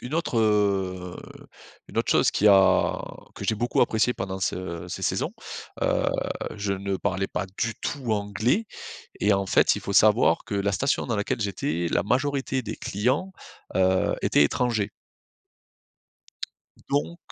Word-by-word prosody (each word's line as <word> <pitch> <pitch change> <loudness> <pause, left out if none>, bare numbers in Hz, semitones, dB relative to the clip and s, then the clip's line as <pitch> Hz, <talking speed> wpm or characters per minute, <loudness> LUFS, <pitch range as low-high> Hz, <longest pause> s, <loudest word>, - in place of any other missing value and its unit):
une 125 +5 -5
autre, 165 -8 0
heu 95 -4 +1 0.7
une - - -4
autre - - 0
chose - - +4
qui 105 - +1
a 95 -1 +5 0.4
que - - -7
j'ai 110 - +1
beaucoup 120 +3 0
apprécié 115 +3 +2
pendant 95 0 -4
ce 90 -2 -3
ces 90 - -6
saisons. - - -1 0.5
Heu, - - +1 0.5
je 100 -1 -1
ne 100 0 -2
parlais 95 0 -1
pas 95 - -3
du 115 -1 0
tout 130 -6 -3
anglais 110 - 0 0.5
et 105 +1 +3
en 100 0 +1
fait - - +4
il - - -4
faut 100 - -4
savoir 105 +3 +4
que 105 - -5
la 100 0 0
station 135 +8 0
dans 115 -3 -1
laquelle 100 +2 -2
j'étais, 85 -4 -1
la - - +2
majorité 130 +3 0
des 110 - -6
clients, 130 - -1 0.4
heu, 95 0 +2
étaient 75 - +4
étrangers. 110 - 0 2.0
Donc. 150 +5 -1
105 Hz, 150 wpm, -25 LUFS, 95-120 Hz, 2.0 s, a